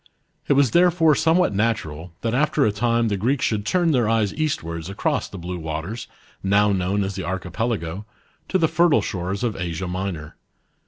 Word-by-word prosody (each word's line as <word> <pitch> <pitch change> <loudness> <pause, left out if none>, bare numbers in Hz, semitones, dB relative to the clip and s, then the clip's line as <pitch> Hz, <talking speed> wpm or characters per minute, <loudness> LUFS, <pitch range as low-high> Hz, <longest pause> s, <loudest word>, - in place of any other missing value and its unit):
It - - +4
was 140 -3 +3
therefore 170 -2 +4
somewhat 165 - +3
natural, 95 -7 -2
that 115 0 -1
after 145 +2 +2
a 105 - +3
time 115 +2 +1
the 100 -2 0
Greeks 125 +6 +1
should 105 -1 -1
turn 175 -3 +2
their 120 -6 +2
eyes 110 -3 +1
eastwards 85 - -3
across 100 - -1
the - - -8
blue 90 0 -5
waters, 80 +9 -5 0.3
now 100 +1 +3
known 95 +2 0
as 95 +1 -3
the 95 0 -5
Archi 95 0 -4
pelago, 105 -5 -2 0.4
to 190 - +2
the 165 -3 +3
fertile 170 -1 +3
shores 95 +3 -3
of 115 -4 -1
Asia 90 0 -4
Minor. 90 -4 -5
105 Hz, 180 wpm, -23 LUFS, 90-130 Hz, 0.4 s, It